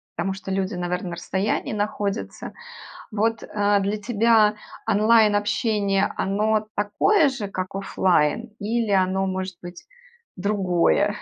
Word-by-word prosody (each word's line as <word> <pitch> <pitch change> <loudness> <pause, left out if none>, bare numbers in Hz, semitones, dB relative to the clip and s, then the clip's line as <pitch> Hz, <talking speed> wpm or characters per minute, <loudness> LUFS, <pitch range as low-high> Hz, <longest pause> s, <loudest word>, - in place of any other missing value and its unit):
потому 185 +3 -1
что 195 0 -7
люди, 190 0 -1
наверное, 180 0 -3
на - - -4
расстоянии 190 +5 -2
находятся. 205 0 -3 0.6
Вот, 220 +1 0
э, 205 -1 +1
для 200 +2 -1
тебя 220 0 +3 0.3
онлайн-общение, 205 -2 +2
оно 215 +2 0
такое 285 - +3
же, 255 -6 -5
как 185 -1 -5
оффлайн, 195 +2 +1
или 225 +1 -1
оно, 190 0 +2
может 190 -1 -4
быть, 175 0 -10 0.5
другое? 200 +1 +1
205 Hz, 120 wpm, -23 LUFS, 190-215 Hz, 0.6 s, тебя